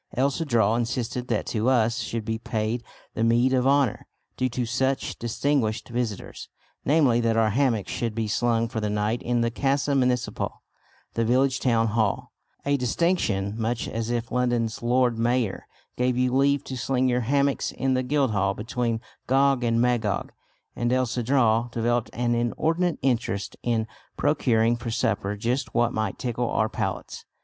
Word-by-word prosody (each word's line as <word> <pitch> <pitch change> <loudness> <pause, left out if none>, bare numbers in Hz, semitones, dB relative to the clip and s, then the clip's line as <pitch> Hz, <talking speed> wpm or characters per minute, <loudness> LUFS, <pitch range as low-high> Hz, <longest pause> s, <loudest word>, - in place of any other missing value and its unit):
El 135 +2 +3
Cedral 115 -8 +1
insisted 120 +1 -2
that 115 -4 -1
to 115 +2 0
us 115 -3 +2
should 115 -2 -3
be 110 0 -2
paid 115 +1 -2 0.3
the 110 - -1
meed 120 +3 +3
of 130 0 +2
honour 140 -5 +2 0.3
due 130 0 0
to 125 0 -2
such 130 +3 -1
distinguished 120 -2 -1
visitors, 120 -4 -4 0.3
namely 140 -5 +3
that 115 -1 +1
our 110 -1 +3
hammocks 120 -4 +1
should 115 -3 -2
be 115 -1 -1
slung 115 +2 +1
for 115 - -4
the 105 - -1
night 105 +3 -1
in 120 0 0
the 115 0 +1
Casa 140 +3 0
Municipal, 125 -2 -1 0.5
the 115 - 0
village 130 +3 +2
town 115 -3 +2
hall; 110 -2 0 0.3
a 140 0 +2
distinction 125 - 0
much 115 +1 -2
as 115 0 -3
if 120 -1 -2
London's 120 -2 0
Lord 120 -1 +2
Mayor 120 -3 0 0.3
gave 125 0 +1
you 125 0 +1
leave 140 +1 +3
to 130 - -6
sling 130 +1 0
your 125 0 +1
hammocks 140 +3 +1
in 135 0 0
the 130 - +1
Guildhall 120 -8 +1
between 115 +1 -2 0.3
Gog 135 0 +3
and 115 -1 +2
Magog. 115 -4 0 0.4
And 120 0 0
El 130 0 +2
Cedral 120 -1 +1
developed 120 0 0
an 120 0 0
inordinate 160 +9 0
interest 115 -6 -1
in 115 -2 0 0.3
procuring 120 -6 +2
for 120 0 -5
supper 105 -3 -1
just 125 +5 -2
what 120 0 +2
might 110 -3 -2
tickle 120 -1 -2
our 110 0 +1
palates. - - -4
120 Hz, 165 wpm, -25 LUFS, 115-130 Hz, 0.5 s, El